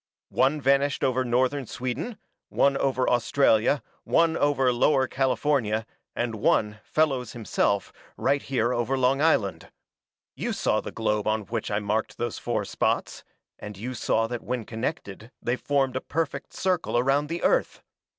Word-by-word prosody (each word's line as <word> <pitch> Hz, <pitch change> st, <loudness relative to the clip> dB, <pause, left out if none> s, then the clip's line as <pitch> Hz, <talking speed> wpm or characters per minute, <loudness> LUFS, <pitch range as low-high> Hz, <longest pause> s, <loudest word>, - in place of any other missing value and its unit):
"One 135 Hz, +4 st, +3 dB
vanished 140 Hz, 0 st, +2 dB
over 130 Hz, 0 st, +2 dB
northern 130 Hz, +2 st, 0 dB
Sweden, 130 Hz, -, -4 dB, 0.3 s
one 140 Hz, 0 st, +3 dB
over 130 Hz, -2 st, 0 dB
Australia, 120 Hz, +1 st, +3 dB, 0.2 s
one 165 Hz, -1 st, +3 dB
over 135 Hz, -3 st, +2 dB
Lower 130 Hz, +2 st, +3 dB
California, 130 Hz, -4 st, 0 dB, 0.3 s
and 120 Hz, -1 st, -1 dB
one, 105 Hz, 0 st, +1 dB
Fellows, 135 Hz, -7 st, 0 dB
himself, 100 Hz, -3 st, 0 dB, 0.2 s
right 140 Hz, 0 st, +1 dB
here 125 Hz, -2 st, 0 dB
over 125 Hz, +3 st, 0 dB
Long 130 Hz, +2 st, +2 dB
Island. 120 Hz, -11 st, +1 dB, 0.7 s
You -, -, -2 dB
saw -, -, +1 dB
the -, -, -7 dB
globe 105 Hz, -2 st, -1 dB
on 110 Hz, 0 st, +1 dB
which 115 Hz, +1 st, -4 dB
I 105 Hz, -, 0 dB
marked 105 Hz, +1 st, -2 dB
those 120 Hz, -2 st, -3 dB
four -, -, -2 dB
spots, -, -, -1 dB, 0.4 s
and 105 Hz, -2 st, -8 dB
you 125 Hz, +6 st, -5 dB
saw 115 Hz, -1 st, +1 dB
that 120 Hz, +1 st, -4 dB
when 125 Hz, -2 st, -3 dB
connected 115 Hz, -3 st, -5 dB
they 120 Hz, -, -1 dB
formed 135 Hz, -1 st, 0 dB
a 130 Hz, -, -1 dB
perfect 145 Hz, -2 st, -3 dB
circle 185 Hz, -9 st, 0 dB
around 135 Hz, +4 st, +2 dB
the 170 Hz, +1 st, -4 dB
Earth. -, -, +1 dB
130 Hz, 150 wpm, -26 LUFS, 115-140 Hz, 0.7 s, One